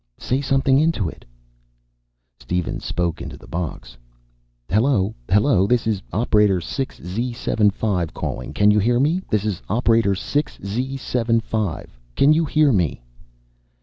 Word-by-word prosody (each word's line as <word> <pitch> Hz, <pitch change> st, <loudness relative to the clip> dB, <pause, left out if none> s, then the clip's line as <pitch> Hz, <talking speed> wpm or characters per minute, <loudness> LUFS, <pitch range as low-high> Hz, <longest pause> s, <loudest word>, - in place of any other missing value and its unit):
"Say 130 Hz, +2 st, -1 dB
something 135 Hz, -1 st, +2 dB
into 155 Hz, -, +1 dB
it." -, -, -13 dB, 1.1 s
Steven 90 Hz, -1 st, -2 dB
spoke 85 Hz, -2 st, -2 dB
into -, -, -7 dB
the -, -, -15 dB
box. 80 Hz, -8 st, -6 dB, 0.7 s
"Hello! 110 Hz, -1 st, +2 dB, 0.2 s
Hello! 100 Hz, 0 st, +3 dB
This 120 Hz, +1 st, +1 dB
is 110 Hz, -4 st, 0 dB
operator 105 Hz, -4 st, +2 dB
6 130 Hz, +10 st, -4 dB
Z75 105 Hz, -3 st, -1 dB
calling. -, -, -5 dB
Can 105 Hz, 0 st, +4 dB
you 105 Hz, -, +3 dB
hear 120 Hz, +4 st, +2 dB
me? 160 Hz, +7 st, +2 dB
This 105 Hz, -1 st, 0 dB
is 105 Hz, -5 st, -2 dB
operator 115 Hz, -2 st, +2 dB
6 145 Hz, +9 st, -2 dB
Z75. 115 Hz, -3 st, -2 dB, 0.3 s
Can 145 Hz, +2 st, +5 dB
you 165 Hz, +1 st, +2 dB
hear 150 Hz, -1 st, +3 dB
me?" 85 Hz, -, 0 dB
110 Hz, 130 wpm, -21 LUFS, 95-130 Hz, 1.1 s, Can